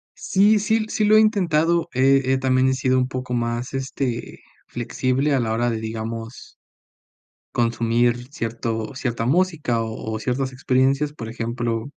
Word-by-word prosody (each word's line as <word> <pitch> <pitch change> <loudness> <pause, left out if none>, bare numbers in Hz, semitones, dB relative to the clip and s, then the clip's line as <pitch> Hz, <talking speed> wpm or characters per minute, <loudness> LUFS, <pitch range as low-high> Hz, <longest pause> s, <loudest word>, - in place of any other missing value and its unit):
Sí, 205 +3 +3
sí, 220 +1 +1
sí 215 - 0
lo 215 +1 +5
he - - +8
intentado, 170 -6 +2
eh 135 +2 +4
eh, 130 +1 +2
también 130 0 +2
he - - +2
sido 130 0 +1
un 130 0 +2
poco 125 -1 -5
más, 120 +1 -2
este, 130 -2 -4 0.3
flexible 130 +4 -1
a - - +2
la 115 -2 -1
hora 120 +2 +1
de, 115 - -1
digamos 115 +1 -6 1.0
consumir 120 +1 +1
cierto 115 -3 -3
cierta 120 -3 -2
música, 155 -6 +1
o 110 0 -5
o - - -2
ciertas 130 +3 -2
experiencias. 135 +3 +1
Por 115 -7 -8
ejemplo, 115 0 -3
125 Hz, 155 wpm, -22 LUFS, 115-140 Hz, 1.0 s, he